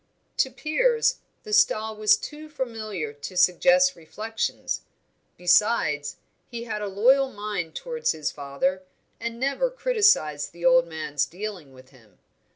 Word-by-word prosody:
To -, -, +2 dB
Piers, 475 Hz, +9 st, +1 dB, 0.2 s
the 430 Hz, -, -7 dB
style 220 Hz, -, +3 dB
was 215 Hz, 0 st, +4 dB
too 305 Hz, +1 st, -9 dB
familiar 215 Hz, -, -4 dB
to 145 Hz, +6 st, -8 dB
suggest 265 Hz, +10 st, +4 dB
reflections: 215 Hz, +7 st, -4 dB, 0.6 s
besides, 175 Hz, -6 st, +2 dB, 0.3 s
he 235 Hz, -1 st, -6 dB
had 215 Hz, -2 st, -4 dB
a 205 Hz, -, -3 dB
loyal 260 Hz, +7 st, +3 dB
mind 205 Hz, -6 st, -4 dB
towards 480 Hz, -1 st, -2 dB
his 155 Hz, -2 st, -3 dB
father, 145 Hz, +7 st, -2 dB, 0.4 s
and 230 Hz, 0 st, -5 dB
never 275 Hz, -, 0 dB
criticised 410 Hz, -, +2 dB
the 170 Hz, 0 st, -7 dB
old 170 Hz, 0 st, +5 dB
man's 155 Hz, -3 st, -2 dB
dealing 185 Hz, -6 st, -7 dB
with 130 Hz, 0 st, -17 dB
him. 110 Hz, -8 st, -22 dB
210 Hz, 135 wpm, -25 LUFS, -, 0.6 s, old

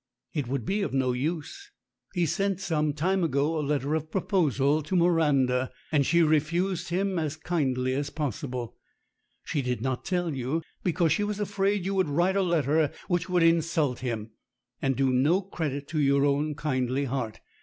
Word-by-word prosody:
"It 145 Hz, -6 st, -2 dB
would 130 Hz, -3 st, -2 dB
be 205 Hz, -, 0 dB
of 195 Hz, -, -2 dB
no 130 Hz, -1 st, +2 dB
use. 160 Hz, -, -3 dB, 0.5 s
He 175 Hz, -1 st, +2 dB
sent 195 Hz, +2 st, 0 dB
some 155 Hz, -5 st, 0 dB
time 180 Hz, +6 st, 0 dB
ago 155 Hz, +1 st, +1 dB
a -, -, 0 dB
letter 145 Hz, 0 st, -1 dB
of 155 Hz, 0 st, -2 dB
proposal 155 Hz, -, +1 dB
to 155 Hz, +5 st, -3 dB
Miranda, 145 Hz, -7 st, +3 dB, 0.2 s
and 145 Hz, -3 st, +3 dB
she 170 Hz, 0 st, +4 dB
refused 170 Hz, +4 st, +1 dB
him 190 Hz, +1 st, 0 dB
as 155 Hz, -2 st, -2 dB
kindly 130 Hz, -6 st, 0 dB
as 140 Hz, +2 st, -1 dB
possible. 130 Hz, -4 st, -4 dB, 0.7 s
She 150 Hz, -, -1 dB
did 125 Hz, -2 st, -2 dB
not 130 Hz, +2 st, -2 dB
tell 175 Hz, -4 st, -1 dB
you, 135 Hz, +5 st, -2 dB, 0.2 s
because 170 Hz, -2 st, +2 dB
she 185 Hz, +7 st, +2 dB
was 205 Hz, 0 st, -2 dB
afraid 200 Hz, -1 st, 0 dB
you 195 Hz, -, -1 dB
would 190 Hz, -5 st, +1 dB
write 175 Hz, +6 st, +2 dB
a 200 Hz, -, +3 dB
letter 155 Hz, -4 st, +2 dB, 0.2 s
which 175 Hz, 0 st, 0 dB
would 180 Hz, -2 st, +3 dB
in 165 Hz, 0 st, +5 dB
sult 155 Hz, -6 st, -1 dB
him, 115 Hz, -3 st, -4 dB, 0.5 s
and 135 Hz, -1 st, +1 dB
do 135 Hz, 0 st, +2 dB
no 145 Hz, +9 st, +3 dB
credit 155 Hz, -7 st, -4 dB
to 155 Hz, -, -1 dB
your 140 Hz, -1 st, +3 dB
own 145 Hz, +1 st, +1 dB
kindly 135 Hz, -2 st, -1 dB
heart. 120 Hz, -4 st, -3 dB
155 Hz, 180 wpm, -27 LUFS, 135-175 Hz, 0.7 s, in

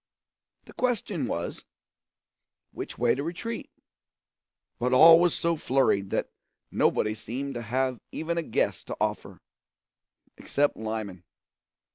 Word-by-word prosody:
The -, -, -14 dB
question 210 Hz, -, -1 dB
was, 85 Hz, +1 st, -4 dB, 1.1 s
which -, -, -7 dB
way 120 Hz, -, +3 dB
to 135 Hz, -, -3 dB
retreat; 185 Hz, +8 st, -5 dB, 1.1 s
but 125 Hz, +1 st, 0 dB
all 165 Hz, +5 st, +9 dB
were 175 Hz, 0 st, +4 dB
so 170 Hz, 0 st, 0 dB
flurried 130 Hz, -9 st, +1 dB
that -, -, -2 dB, 0.4 s
nobody 105 Hz, 0 st, +2 dB
seemed 130 Hz, +6 st, -5 dB
to 120 Hz, -, -4 dB
have 125 Hz, +2 st, -1 dB
even 170 Hz, +1 st, -2 dB
a -, -, 0 dB
guess 160 Hz, -, -1 dB
to -, -, -6 dB
offer. -, -, -2 dB, 1.0 s
Except 145 Hz, +1 st, 0 dB
Lyman. 110 Hz, -5 st, -5 dB
135 Hz, 120 wpm, -27 LUFS, 110-165 Hz, 1.1 s, all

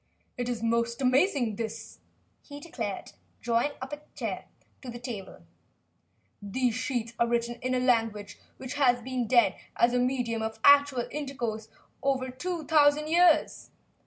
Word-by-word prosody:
"It 245 Hz, 0 st, -3 dB
is 235 Hz, -2 st, -3 dB
most 235 Hz, +1 st, 0 dB
amazing, 255 Hz, -, +2 dB
this," 225 Hz, -1 st, -6 dB, 0.4 s
he 285 Hz, -1 st, -10 dB
declared, 335 Hz, +3 st, -5 dB, 0.3 s
drawing 240 Hz, +5 st, 0 dB
a 290 Hz, +3 st, -6 dB, 0.2 s
chair -, -, -4 dB
up -, -, -36 dB, 0.2 s
to 260 Hz, -, -8 dB
the 240 Hz, -, -6 dB
table. 235 Hz, -5 st, -8 dB, 1.0 s
"These 235 Hz, +4 st, -1 dB
sheets 240 Hz, -1 st, -3 dB
are 235 Hz, -, +3 dB
written 235 Hz, 0 st, -1 dB
in 255 Hz, 0 st, -1 dB
a -, -, +1 dB
language 225 Hz, -5 st, 0 dB, 0.2 s
which 260 Hz, +1 st, -6 dB
has 250 Hz, -4 st, +2 dB
been 255 Hz, -2 st, -2 dB
dead 240 Hz, 0 st, +3 dB, 0.2 s
as 240 Hz, +1 st, +3 dB
a 250 Hz, -, +2 dB
medium 245 Hz, -3 st, 0 dB
of 220 Hz, 0 st, -4 dB
actual 285 Hz, -3 st, +5 dB
intercourse 240 Hz, -7 st, -4 dB
for -, -, -33 dB, 0.3 s
over 260 Hz, -2 st, 0 dB
two 340 Hz, +5 st, -4 dB
thousand 300 Hz, 0 st, +4 dB
years. 345 Hz, 0 st, +3 dB
250 Hz, 155 wpm, -28 LUFS, 235-275 Hz, 1.0 s, actual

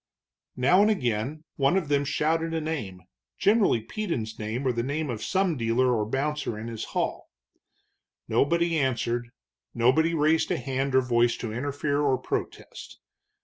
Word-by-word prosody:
Now 155 Hz, +10 st, +4 dB
and 210 Hz, -, +4 dB
again 130 Hz, -, -1 dB
one 140 Hz, +6 st, +3 dB
of 180 Hz, -6 st, -1 dB
them 145 Hz, 0 st, +1 dB
shouted 165 Hz, +3 st, 0 dB
a -, -, +1 dB
name, 115 Hz, -, -4 dB, 0.3 s
generally 205 Hz, -, +3 dB
Peden's 115 Hz, -, -4 dB
name, 110 Hz, +5 st, -3 dB
or 130 Hz, -, +3 dB
the 120 Hz, -1 st, -1 dB
name 145 Hz, +3 st, -2 dB
of 110 Hz, -2 st, -5 dB
some 190 Hz, -3 st, +1 dB
dealer 120 Hz, +2 st, +2 dB
or 105 Hz, -2 st, -1 dB
bouncer 140 Hz, -3 st, -2 dB
in 110 Hz, -, -6 dB
his 115 Hz, -2 st, -5 dB
hall. -, -, -2 dB, 1.0 s
Nobody 170 Hz, +2 st, +2 dB
answered, 120 Hz, -3 st, -1 dB, 0.5 s
nobody 135 Hz, +8 st, +3 dB
raised 155 Hz, +1 st, +2 dB
hand 135 Hz, +1 st, -1 dB
or 130 Hz, -, +6 dB
voice 120 Hz, -1 st, +2 dB
to 115 Hz, -3 st, -5 dB
interfere 145 Hz, +3 st, -1 dB
or 135 Hz, -3 st, +2 dB
protest. 130 Hz, -, -6 dB
135 Hz, 150 wpm, -26 LUFS, 120-160 Hz, 1.0 s, or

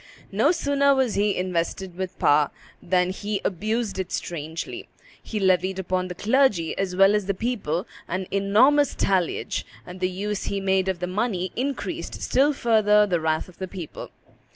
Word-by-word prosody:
No 225 Hz, +10 st, +3 dB
sooner 280 Hz, -4 st, +2 dB
was 260 Hz, -5 st, +1 dB
he 205 Hz, 0 st, +1 dB
invested 180 Hz, 0 st, -2 dB
with 185 Hz, 0 st, -5 dB
power 145 Hz, 0 st, +4 dB, 0.3 s
than 180 Hz, 0 st, +1 dB
he 205 Hz, +1 st, -3 dB
abused 215 Hz, +2 st, -1 dB
it 190 Hz, -, -3 dB
strangely; 160 Hz, 0 st, -5 dB, 0.3 s
he 215 Hz, -, -4 dB
levied 190 Hz, 0 st, +2 dB
upon 185 Hz, 0 st, -1 dB
the 180 Hz, -, -6 dB
clergy 210 Hz, -5 st, +2 dB
as 190 Hz, -2 st, -2 dB
well 195 Hz, +2 st, +6 dB
as 210 Hz, -2 st, 0 dB
the 200 Hz, -, 0 dB
people 195 Hz, -7 st, -2 dB, 0.2 s
an 185 Hz, +2 st, -2 dB
enormous 235 Hz, +9 st, +4 dB
talliage, 185 Hz, -3 st, 0 dB, 0.2 s
and 180 Hz, +1 st, -9 dB
the 185 Hz, 0 st, +1 dB
use 200 Hz, +2 st, -3 dB
he 200 Hz, -, -2 dB
made 190 Hz, -1 st, +1 dB
of 185 Hz, -2 st, -2 dB
the -, -, 0 dB
money 185 Hz, -1 st, -1 dB
increased 275 Hz, +3 st, -3 dB
still 280 Hz, +3 st, +3 dB
further 215 Hz, -5 st, +4 dB
the 180 Hz, -4 st, 0 dB
wrath 155 Hz, 0 st, 0 dB
of 180 Hz, -, -17 dB
the 190 Hz, -, -3 dB
public. 180 Hz, -4 st, -8 dB
190 Hz, 170 wpm, -24 LUFS, 180-215 Hz, 0.3 s, well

